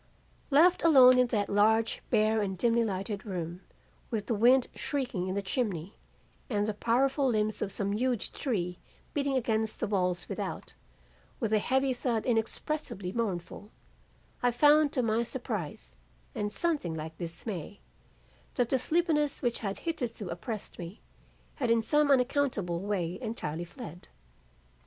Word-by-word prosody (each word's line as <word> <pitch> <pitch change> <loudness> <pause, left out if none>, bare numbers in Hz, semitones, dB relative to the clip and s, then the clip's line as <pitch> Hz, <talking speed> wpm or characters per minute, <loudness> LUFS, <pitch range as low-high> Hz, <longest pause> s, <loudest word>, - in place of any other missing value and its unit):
"Left 330 +6 +5
alone 255 -6 +7
in 250 - +4
that 210 -4 0
large, 220 +2 +2
bare 220 -1 +3
and 190 -2 -2
dimly 235 +4 +3
lighted 200 -1 -3
room, 175 -3 -5 0.5
with 220 -4 -2
the 235 - -1
wind 245 +4 +5
shrieking 245 -11 -2
in 185 - -2
the 200 - -1
chimney 195 - -2 0.6
and 205 -3 +1
the 215 - -1
powerful 265 +6 +2
limbs 215 -2 0
of 200 - -1
some 200 0 0
huge 240 +1 0
tree 180 -9 -2 0.3
beating 280 -2 +1
against 220 -3 -1
the - - 0
walls 180 -4 0
without, - - -5 0.7
with 220 -1 -1
a 215 - +5
heavy 265 +4 +1
thud 240 -3 -1
inexpressibly 230 - -2
mournful, 200 -2 -3 0.7
I 245 - +4
found 295 +4 +5
to 255 - +1
my 225 0 +2
surprise 215 - -5 0.4
and 205 0 -2
something 290 - -1
like 160 0 -7
dismay, 175 +2 -6 0.8
that 245 -2 +1
the 265 - +2
sleepiness 310 -1 +1
which 240 -1 0
had 200 -3 -4
hitherto 245 - -3
oppressed 200 +5 -6
me, 175 +3 -7 0.6
had 250 -4 -1
in 230 -1 +3
some 295 +4 +3
unaccountable 250 - +1
way 185 -3 -2
entirely 175 - -4
fled. 175 - -10
220 Hz, 145 wpm, -30 LUFS, 195-255 Hz, 0.8 s, alone